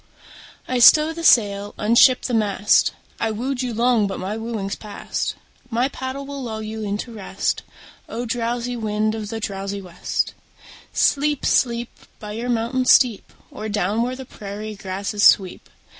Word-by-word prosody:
I 255 -1 0
stow 305 +6 +7
the 335 0 -7
sail, 205 -7 +3
unship 235 +4 +5
the 250 - -3
mast: 210 -2 +3 0.3
I 225 - 0
wooed 245 +4 -2
you 250 -1 -2
long 230 -2 +2
but 195 - -5
my 195 +3 -3
wooing's 220 -3 -4
past; 210 -2 -4 0.3
My 245 +3 +1
paddle 265 +1 -5
will 280 0 -6
lull 220 -3 -5
you 220 +1 -5
into 210 +3 -4
rest. 205 -4 -2 0.5
O! 235 +2 -4
drowsy 240 +1 -2
wind 215 -1 -1
of 215 -2 -5
the 225 0 -4
drowsy 200 -1 -4
west, 180 -3 -3 0.6
Sleep, 290 0 +1
sleep, 235 -1 +2 0.3
By 210 -1 -7
your 230 +3 -4
mountain 240 +2 0
steep, 245 -5 +4 0.2
Or 215 +1 -6
down 205 +1 0
where 250 +2 -1
the 265 0 -8
prairie 210 -1 -7
grasses 200 +1 -4
sweep! 190 -3 +4
225 Hz, 160 wpm, -22 LUFS, 210-245 Hz, 0.6 s, stow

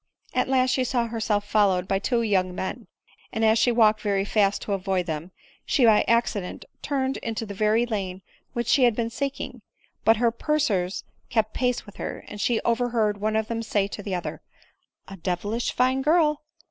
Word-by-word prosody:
At 255 - +1
last 255 -1 +3
she 260 - +1
saw 245 -2 0
herself 220 -3 -1
followed 195 -3 +2
by 195 0 +1
two 235 +3 0
young 185 -4 +1
men; 215 +6 -5 0.4
and 220 0 0
as 220 +1 +4
she 245 - +4
walked 220 -2 +4
very 200 -2 0
fast 205 -1 +1
to 205 - -2
avoid 190 -2 -1
them, 160 +1 -4 0.3
she 260 - +2
by 220 -2 +6
acci 235 -3 +2
dent 180 - -8 0.2
turned 270 -2 -1
into 225 -1 -4
the 205 - -7
very 215 +3 +2
lane 195 -5 -4 0.3
which 240 -1 -2
she 255 +3 +4
had 240 -3 +3
been 230 0 -2
seek 275 +2 -3
ing; - - -7 0.4
but 225 0 +5
her 235 0 +3
pursuers 225 -9 0 0.3
kept 220 -2 0
pace 250 -1 0
with 205 - -14
her; - - -6
and 210 - -7
she 235 0 +2
over 245 +1 +1
heard 210 -4 0
one 215 +1 0
of 220 0 0
them 230 0 -2
say 205 -3 0
to 205 - -6
the 195 -2 -3
other, 175 - -5 0.3
" - - -48
A 195 - -9
devilish 190 +7 -2
fine 260 +1 +2
girl 300 0 +3
220 Hz, 205 wpm, -25 LUFS, 200-240 Hz, 0.4 s, by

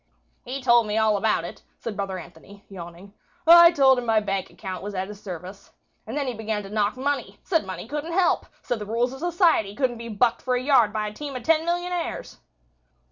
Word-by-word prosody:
"He 260 +2 -6
told 240 -3 +5
me 210 +1 -1
all 220 -1 +3
about 215 +2 +1
it," - - -9 0.2
said 225 -3 -6
brother 195 -2 -3
Anthony, 190 +4 -13
yawning. 180 +1 -10 0.3
"I 340 +1 +10
told 265 -5 +4
him 245 - -5
my 220 -1 +4
bank 195 -2 -3
account 190 -3 -7
was 205 0 -6
at 190 +1 -3
his 210 -1 -10
service. 185 +1 -9 0.4
And 235 +6 -4
then 285 - -1
he 255 - -2
began 215 -1 -3
to 195 - -10
knock 210 +2 0
money. 285 +2 -2
Said 330 - 0
money 190 +3 -6
couldn't 300 +5 -4
help. 365 -1 +2 0.2
Said 245 - -2
the 210 - -6
rules 240 +3 0
of 265 - -9
society 330 - +2
couldn't 250 -3 -1
be 235 0 -7
bucked 230 +2 +1
for 255 -1 0
a - - +1
yard 255 -6 +4
by 215 0 -2
a 210 - -6
team 285 +3 -7
of 250 - -5
ten 320 +3 +2
millionaires." 350 0 -3
230 Hz, 220 wpm, -24 LUFS, 205-280 Hz, 0.4 s, I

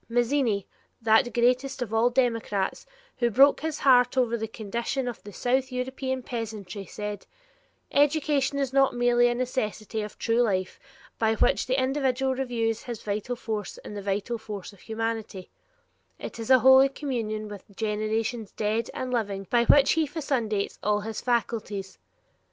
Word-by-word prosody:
Mazzini, 240 -3 +1 0.3
that 225 +1 +3
greatest 255 +3 +1
of 225 -2 -8
all 225 +2 +4
democrats, 230 -6 0 0.3
who 240 - +2
broke 270 +5 +5
his 315 -1 -3
heart 250 -1 +4
over 240 -2 +2
the 225 -1 -3
condition 235 +5 -3
of 240 - -5
the 205 - -10
South 260 +5 0
European 260 +1 -3
peasantry, 215 -5 -5
said: 210 -1 -6 0.6
"Education 290 -1 +2
is 270 -2 -1
not 270 -2 +3
merely 240 0 +4
a 240 - 0
necessity 220 -4 -2
of 210 0 -7
true 230 +1 +1
life 185 -5 0 0.4
by 220 -1 +2
which - - +2
the 260 +1 +1
individual 265 0 +1
renews 235 -4 -1
his 235 -3 -7
vital 215 +4 -2
force 215 -4 -4
in - - -7
the 205 - -5
vital 200 +4 -2
force 210 -2 -7
of 200 - -18
humanity; 225 -4 -4 0.7
it - - -8
is 225 - -5
a 260 - +8
Holy 265 +1 +8
Communion 230 -7 -3
with 205 -2 -9
generations 220 +1 -2
dead 220 +2 -1
and 255 -1 -3
living, 200 -4 -2
by 235 -1 +4
which 280 +3 +6
he 320 -1 +2
fecundates 255 -9 -2
all 210 0 +1
his 220 +1 -5
faculties. 220 -5 -2
235 Hz, 155 wpm, -26 LUFS, 215-260 Hz, 0.7 s, a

